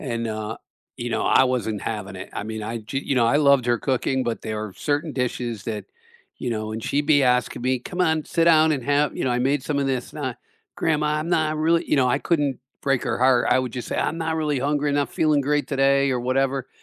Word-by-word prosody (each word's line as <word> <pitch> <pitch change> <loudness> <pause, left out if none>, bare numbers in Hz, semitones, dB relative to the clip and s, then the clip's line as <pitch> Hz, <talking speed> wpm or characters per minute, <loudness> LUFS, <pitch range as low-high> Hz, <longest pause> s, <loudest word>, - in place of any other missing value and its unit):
and, 115 -4 -3
uh, 110 0 -4 0.4
you 120 - -3
know, 110 - 0
I 130 - +5
wasn't 115 -5 -1
having 105 -3 -4
it. 95 - -8
I - - -3
mean 110 0 -5
I 115 +2 -4
g 115 +5 -4
you 140 - -2
know, 120 -2 +3
I 130 - +3
loved 140 -4 +4
her 120 -1 +2
cooking, 130 0 0
but 120 -2 -3
there 110 -1 -3
are 105 -3 -7
certain 150 +1 -1
dishes 120 -4 -3
that, 110 -2 -4 0.5
you 125 - -3
know, 110 -1 -3
and 110 0 -5
she'd 145 +1 0
be 145 -3 +5
asking 125 -2 +1
me, 130 0 +1
"Come 180 +9 -6
on, 160 -3 +1
sit 165 - +1
down 160 -1 +5
and 135 -5 -3
have, 145 0 +1
you - - -2
know, 130 - +1
I 120 - +1
made 135 +2 +1
some 145 -2 -2
of 140 - 0
this 130 -2 -2
sna" 130 -5 -4 0.4
"Grandma, 150 -2 +1
I'm 165 - -4
not 155 -2 +1
really" 165 +2 +2
you 150 - +4
know, 130 -2 +3
I 140 - +2
couldn't 145 -6 0 0.2
break 135 -2 +1
her 120 -2 -1
heart. 130 -1 +4
I - - +5
would, 125 -2 -2
just, 125 - -5
say, - - -3
"I'm 165 - -1
not 160 0 -1
really 150 -3 0
hungry, 145 +2 0
I'm 140 - 0
not 145 - +1
feeling 155 -2 +2
great 145 +1 0
today 140 0 +3
or 125 -2 0
whatever." 135 +1 0
135 Hz, 255 wpm, -23 LUFS, 120-145 Hz, 0.5 s, I